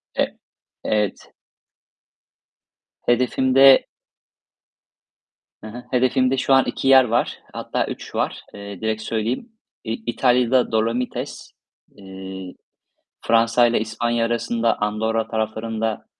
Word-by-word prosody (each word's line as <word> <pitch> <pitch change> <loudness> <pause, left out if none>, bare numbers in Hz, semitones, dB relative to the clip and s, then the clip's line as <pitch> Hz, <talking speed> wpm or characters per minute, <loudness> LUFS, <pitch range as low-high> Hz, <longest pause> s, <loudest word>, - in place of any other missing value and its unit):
E - - -1 0.5
evet. 105 -2 -2 1.7
Hedefimde 130 +2 +4 1.8
Hı 110 - -7
hı. 120 +3 -9
Hedefimde 130 +1 +2
şu 135 +1 +2
an 135 - +5
2 135 - -3
yer 135 -1 +8
var, 120 0 -1
hatta - - -2
3 - - -8
var. - - -2
Eee, 100 -2 -9
direkt 110 0 -2
söyleyeyim. 115 - -3 0.3
İ 110 - -5 0.2
İtalya'da 125 0 +2
Dolomites, 115 +3 -2 0.5
eee, 95 -1 -9 0.7
Fransa'yla 115 +1 +3
İspanya 115 +2 -1
arasında 115 0 0
Andorra 110 +1 -1
taraflarında 110 0 -3
115 Hz, 95 wpm, -21 LUFS, 110-125 Hz, 1.8 s, yer